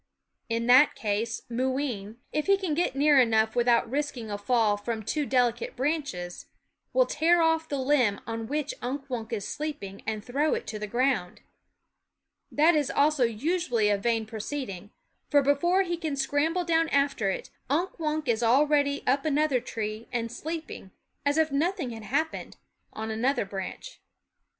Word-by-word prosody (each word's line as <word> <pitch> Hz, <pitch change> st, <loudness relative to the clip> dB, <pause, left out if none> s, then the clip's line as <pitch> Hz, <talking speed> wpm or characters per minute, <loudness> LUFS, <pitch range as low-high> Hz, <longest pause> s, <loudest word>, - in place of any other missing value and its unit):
In 230 Hz, 0 st, -1 dB
that 255 Hz, +5 st, +6 dB
case 220 Hz, +2 st, -2 dB
Moo 250 Hz, +2 st, -1 dB
ween, 230 Hz, -6 st, -4 dB, 0.2 s
if 305 Hz, +3 st, -1 dB
he 395 Hz, 0 st, +5 dB
can 375 Hz, -5 st, -2 dB
get 325 Hz, -3 st, 0 dB
near 290 Hz, 0 st, +5 dB
enough 220 Hz, -2 st, +3 dB
without 240 Hz, -1 st, +3 dB
risking 255 Hz, -4 st, -3 dB
a 205 Hz, -, -2 dB
fall 220 Hz, -1 st, +2 dB
from 220 Hz, +2 st, -4 dB
too 295 Hz, +6 st, -1 dB
delicate 245 Hz, -2 st, +1 dB
branches, 260 Hz, -, -3 dB, 0.4 s
will -, -, +4 dB
tear 340 Hz, -3 st, +3 dB
off 325 Hz, 0 st, +1 dB
the 285 Hz, -, -1 dB
limb 260 Hz, -6 st, +2 dB
on 225 Hz, 0 st, -4 dB
which 295 Hz, +2 st, -2 dB
Unk 275 Hz, +3 st, -4 dB
Wunk 230 Hz, -2 st, -4 dB
is 210 Hz, -4 st, -3 dB
sleeping 275 Hz, -11 st, -5 dB
and 215 Hz, -1 st, -3 dB
throw 285 Hz, +5 st, +1 dB
it -, -, -5 dB
to 215 Hz, -, -5 dB
the 210 Hz, -, -4 dB
ground. 240 Hz, -5 st, 0 dB, 1.1 s
That 315 Hz, +3 st, +4 dB
also 290 Hz, -3 st, +3 dB
is 230 Hz, 0 st, -5 dB
usually 305 Hz, -11 st, +1 dB
a 205 Hz, -, +3 dB
vain 225 Hz, +1 st, 0 dB
proceeding; 215 Hz, -3 st, -5 dB, 0.4 s
for 285 Hz, -2 st, +4 dB
before 345 Hz, +8 st, +3 dB
he 345 Hz, -2 st, -2 dB
can 315 Hz, -4 st, -3 dB
scramble 290 Hz, +6 st, 0 dB
down 330 Hz, -1 st, +2 dB
after 275 Hz, -7 st, +1 dB
it, 190 Hz, -, -4 dB, 0.2 s
Unk 340 Hz, +6 st, -1 dB
Wunk 310 Hz, -2 st, -2 dB
is 235 Hz, -1 st, +1 dB
already 285 Hz, +4 st, +3 dB
up 275 Hz, +2 st, +2 dB
another 300 Hz, -3 st, +2 dB
tree 220 Hz, -2 st, -5 dB
and 230 Hz, -2 st, -2 dB
sleeping, 315 Hz, -, -6 dB, 0.4 s
as 285 Hz, +2 st, +2 dB
if 315 Hz, -2 st, +2 dB
nothing 315 Hz, -, 0 dB
had 225 Hz, -2 st, -8 dB
happened, 300 Hz, +9 st, -2 dB, 0.3 s
on 220 Hz, 0 st, -5 dB
another 240 Hz, +2 st, 0 dB
branch. 195 Hz, -, -7 dB
260 Hz, 165 wpm, -27 LUFS, 225-300 Hz, 1.1 s, that